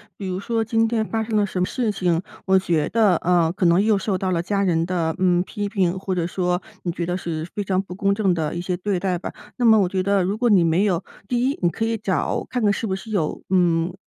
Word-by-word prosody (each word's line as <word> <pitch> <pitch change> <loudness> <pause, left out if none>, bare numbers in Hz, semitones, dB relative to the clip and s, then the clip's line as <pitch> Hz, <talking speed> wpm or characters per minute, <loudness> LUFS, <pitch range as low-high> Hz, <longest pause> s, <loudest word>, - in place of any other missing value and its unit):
比 200 - -7
如 185 0 -3
说 225 +2 -1
今 225 0 +1
天 225 -1 0
发 225 +1 -2
生 220 0 -3
了 210 -1 +3
什 190 -2 -4
么 180 - +2
事 235 +2 -1
情， 175 -4 0 0.2
我 190 0 +4
觉 170 -5 +1
得， 215 -6 +3
呃， 170 -1 +2
可 190 +1 -1
能 175 +3 +4
又 215 -1 +3
受 195 0 -1
到 185 0 -2
了 170 -2 +1
家 200 +3 -1
人 165 -3 +1
的， 170 -2 -1
嗯， 180 -1 +3
批 205 +1 -4
评， 190 -3 0
或 190 -1 -3
者 175 -2 0
说 180 0 -1 0.2
你 175 - -1
觉 170 - -3
得 180 +1 -2
是 160 -3 -4
非 205 - -3
常 185 -1 +1
不 190 -2 -9
公 200 +1 +1
正 200 -3 +2
的 160 -2 -2
一 175 - -3
些 180 0 -2
对 195 +1 -1
待 180 0 -1
吧。 - - -6 0.2
那 245 - +1
么 220 -1 +7
我 185 - +1
觉 185 0 -1
得 200 0 +2
如 195 +4 -1
果 240 +1 +2
你 195 -5 +5
没 170 +4 +2
有 180 -5 0 0.2
第 245 +2 +1
一 280 - -4
你 175 - +3
可 225 - -4
以 225 0 0
找 200 -4 -1
看 250 -2 -2
看 205 - +4
是 210 +3 -2
不 190 - -1
是 215 +3 -9
有， 170 -8 -1
嗯， 175 -2 +2
190 Hz, 295 characters per minute, -22 LUFS, 175-210 Hz, 0.2 s, 么